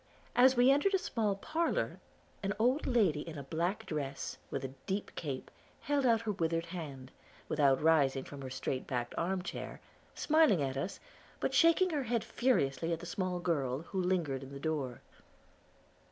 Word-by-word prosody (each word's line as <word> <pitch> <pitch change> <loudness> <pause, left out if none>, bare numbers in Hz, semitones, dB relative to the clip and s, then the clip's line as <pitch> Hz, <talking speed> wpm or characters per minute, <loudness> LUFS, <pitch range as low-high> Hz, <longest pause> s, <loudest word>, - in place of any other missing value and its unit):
As 255 +1 +6
we 250 +2 +7
entered 340 +8 +3
a - - +5
small 220 - -1
parlor, 325 +12 -1 0.4
an 195 0 -1
old 250 +7 +2
lady 210 - +3
in 160 -1 -7
a 140 - -5
black 170 +7 -2
dress, 140 -3 -3
with - - -3
a 130 - -6
deep 200 +1 -2
cape, 135 -5 -5 0.3
held 285 -2 +1
out 230 -2 +4
her 225 -2 -1
withered 165 -3 0
hand, 145 -7 -7 0.4
without 140 -3 +3
rising 140 -5 +4
from 140 -1 -9
her 130 - -5
straight 130 0 -3
backed 120 -3 -2
arm 185 +2 -1
chair, - - -6 0.4
smiling 310 - +4
at 135 -1 -2
us, 140 +8 -3 0.4
but - - -1
shaking 340 +2 +5
her 290 -4 -1
head 235 -1 0
furiously 165 - +1
at 165 - -1
the 175 - -8
small 180 +1 -2
girl, 145 -6 -1
who 190 +2 -3
lingered 170 -8 0
in 135 0 -9
the 140 - -7
door. 140 -5 -2
170 Hz, 175 wpm, -33 LUFS, 140-230 Hz, 0.4 s, we